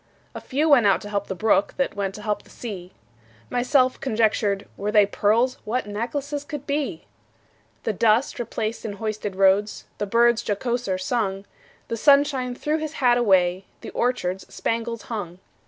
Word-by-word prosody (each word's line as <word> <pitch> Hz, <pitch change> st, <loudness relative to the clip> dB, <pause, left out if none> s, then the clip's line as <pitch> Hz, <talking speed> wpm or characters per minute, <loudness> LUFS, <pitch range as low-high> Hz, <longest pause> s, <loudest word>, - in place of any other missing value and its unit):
A -, -, -7 dB
few 290 Hz, +4 st, 0 dB
went 265 Hz, -8 st, +6 dB
out 195 Hz, -, +4 dB
to 205 Hz, -, -8 dB
help 200 Hz, -1 st, -2 dB
the 190 Hz, -, -4 dB
brook, 205 Hz, 0 st, +2 dB
That 275 Hz, -, 0 dB
went 195 Hz, -1 st, -2 dB
to 210 Hz, -, -9 dB
help 210 Hz, -1 st, -1 dB
the -, -, -22 dB
sea. 190 Hz, -6 st, -7 dB, 0.6 s
Myself 255 Hz, +1 st, +2 dB
conjectured, 215 Hz, -4 st, 0 dB
Were 205 Hz, +1 st, -3 dB
they 210 Hz, -1 st, +6 dB
pearls, 225 Hz, +5 st, +1 dB
What 245 Hz, +4 st, -2 dB
necklaces 270 Hz, +8 st, -3 dB
could 290 Hz, -2 st, -7 dB
be! 280 Hz, -, -2 dB, 0.8 s
The 220 Hz, -, -1 dB
dust 225 Hz, +5 st, +2 dB
replaced 225 Hz, -1 st, -3 dB
in 215 Hz, -, -4 dB
hoisted 210 Hz, -1 st, -4 dB
roads, 195 Hz, +2 st, +2 dB
The 205 Hz, -, -1 dB
birds 235 Hz, +2 st, +4 dB
jocoser 235 Hz, -2 st, -1 dB
sung; 195 Hz, -1 st, -1 dB, 0.4 s
The 230 Hz, -, -3 dB
sunshine 280 Hz, -2 st, +3 dB
threw 305 Hz, +4 st, -1 dB
his 310 Hz, 0 st, -4 dB
hat 245 Hz, -4 st, +3 dB
away, 190 Hz, -4 st, +3 dB, 0.2 s
The -, -, -8 dB
orchards 195 Hz, -7 st, -2 dB
spangles 230 Hz, 0 st, -3 dB
hung. 190 Hz, -7 st, -5 dB
220 Hz, 165 wpm, -24 LUFS, 200-250 Hz, 0.8 s, went